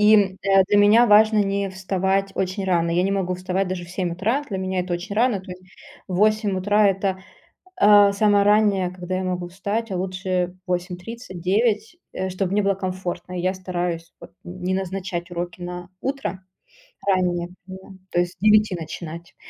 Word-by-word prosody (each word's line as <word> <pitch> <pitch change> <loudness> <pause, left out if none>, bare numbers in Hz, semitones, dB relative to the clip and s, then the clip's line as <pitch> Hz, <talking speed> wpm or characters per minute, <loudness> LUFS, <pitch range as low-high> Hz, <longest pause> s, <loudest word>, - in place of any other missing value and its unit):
и 205 -3 +5 0.3
для 205 - +4
меня 215 +4 +6
важно 215 +1 +6
не 200 0 -1
вставать 190 +1 -1
очень 190 +1 -2
рано. 170 -2 +1
Я 175 +2 +2
не 195 - 0
могу 185 -2 -1
вставать 185 +1 -2
даже 180 -1 -4
в 170 - -13
7 180 -2 -2
утра, 225 +11 -1
для 195 -3 -3
меня 185 -1 -1
это 180 0 -4
очень 180 +4 -5
рано. 225 -3 +2
То 185 - -12
есть 180 0 -9 0.4
8 210 +1 +1
утра- 205 +2 +3
это, 190 -1 -1 0.5
а, 205 -1 +6
самое 205 -1 +3
раннее, 205 -3 +3
когда 185 0 -5
я 185 - -2
могу 180 -1 -3
встать, 205 +4 -3
а 185 - -2
лучше 185 -1 -2
8:30, 180 +3 -5
9, 215 - +1 0.2
э, 190 0 -3
чтоб 185 0 -2
мне 205 +1 +2
было 195 0 +2
комфортно. 185 -1 -5
И - - -1
я 185 +1 +1
стараюсь 175 -2 -4
вот - - -12
не 180 +1 -4
назначать 185 -1 -4
уроки 175 +1 -5
на 175 0 -6
утро 270 -9 -3 0.7
раннее, 180 -2 +1 0.2
примерно, 190 0 -11
то 175 - 0
есть 175 0 0
с - - -34
9 215 -1 +4
начинать. 170 0 -8
190 Hz, 180 wpm, -23 LUFS, 180-205 Hz, 0.7 s, меня